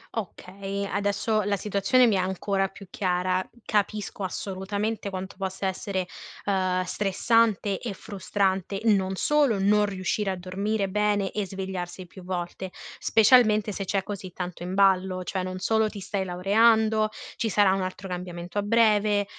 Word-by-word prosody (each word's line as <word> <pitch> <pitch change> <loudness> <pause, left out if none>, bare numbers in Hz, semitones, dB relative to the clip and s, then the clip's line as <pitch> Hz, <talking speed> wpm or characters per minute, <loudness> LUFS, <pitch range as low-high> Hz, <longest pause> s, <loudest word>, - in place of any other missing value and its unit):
Okay, 200 -1 -5
adesso 205 +2 0
la 205 0 0
situazione 210 +6 +3
mi 225 - +3
è - - +2
ancora 195 +1 0
più 195 +1 -13
chiara. 185 0 0 0.2
Capisco 210 -1 -1
assolutamente 200 +3 -3
quanto 190 0 -6
possa 190 0 -3
essere, 190 0 -2 0.4
ehm, 185 -2 +1
stressante 205 +1 +1
e 230 -5 -4
frustrante, 195 -1 -1
non 195 -4 +2
solo 285 -1 +2
non 205 +2 +3
riuscire 195 +1 -1
a 190 - -1
dormire 195 +3 -2
bene 205 0 +1
e 210 -2 -2
svegliarsi 185 -2 -5
più 185 +1 -13
volte, 180 +1 -4 0.3
specialmente 215 -2 +5
se 195 0 -4
c'è 195 +1 0
così 190 -2 -6
tanto 180 -1 -6
in 180 +2 -4
ballo: 190 -2 +3
cioè 190 +1 -2
non 185 0 -4
solo 220 +3 +2
ti 210 - -8
stai 195 0 -3
laureando, 215 +4 +3 0.3
ci 225 - 0
sarà 200 -2 +4
un 195 - 0
altro 185 +1 -5
cambiamento 180 +1 -5
a - - +2
breve, 210 -1 +3
195 Hz, 150 wpm, -26 LUFS, 185-210 Hz, 0.4 s, specialmente